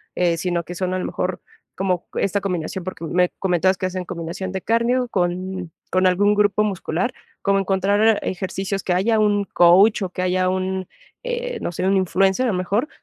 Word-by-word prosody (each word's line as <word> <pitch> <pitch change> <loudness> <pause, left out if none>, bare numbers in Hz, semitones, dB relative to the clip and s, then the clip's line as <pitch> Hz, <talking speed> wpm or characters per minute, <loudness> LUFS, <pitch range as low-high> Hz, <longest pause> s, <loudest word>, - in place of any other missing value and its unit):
eh, 170 -2 +1
sino 175 0 -1
que 175 - -8
son, 185 +1 -2
a 185 - -1
lo - - -3
mejor, 180 0 -3 0.3
como 180 -2 -1
esta 200 +1 0
combinación, 180 -1 -3
porque, 185 -2 -6
me 180 +2 +2
comentabas 185 0 +2
que 185 - -2
hacen 185 0 -3
combinación 170 +3 -5
de 190 -1 -4
cardio 240 +2 +1
con 180 -1 -2 0.2
con 185 0 +3
algún 205 +3 +3
grupo 205 0 +3
muscular. 195 +2 -2 0.3
Cómo 195 0 +2
encontrar 200 +3 +2
ejercicios 195 +1 -3
que 180 - 0
haya 215 +5 +2
un 205 -1 +2
coach 190 +6 +5
o 190 - -2
que 185 - -5
haya 185 0 +1
un, 185 0 -2 0.4
eh, - - -3
no - - -2
sé, 180 +2 -3
un 195 - +3
influencer, 190 +5 +2
a - - +1
lo - - -2
mejor, 205 - 0
190 Hz, 195 wpm, -21 LUFS, 180-200 Hz, 0.4 s, coach